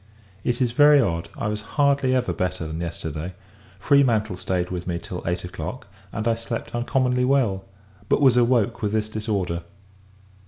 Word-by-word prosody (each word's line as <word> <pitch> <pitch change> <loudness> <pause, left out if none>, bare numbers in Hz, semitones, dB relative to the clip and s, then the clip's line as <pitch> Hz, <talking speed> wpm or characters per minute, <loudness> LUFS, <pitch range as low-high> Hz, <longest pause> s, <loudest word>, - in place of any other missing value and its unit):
It 120 +1 +1
is 120 - 0
very 145 +3 +6
odd! 85 -9 0
I - - -2
was 105 0 -2 0.2
hardly 140 -2 +3
ever 120 -8 0
better 90 -1 -2
than 80 +1 -5
yesterday. 80 +1 -5 0.4
Freemantle 115 -8 +3
stayed 90 -1 -2
with 90 -1 -4
me 85 -1 -1
till 90 +1 -6
eight 85 0 -1
o'clock, 90 - -6 0.3
and 110 +2 -3
I 115 - +4
slept 115 0 -5
uncommonly 125 +1 +1
well; 120 -8 +1 0.4
but, - - +3
was 135 -4 +5
awoke 120 -2 +2
with 105 -1 -1
this 110 -1 0
disorder. 100 -6 -2
110 Hz, 165 wpm, -24 LUFS, 90-125 Hz, 0.4 s, very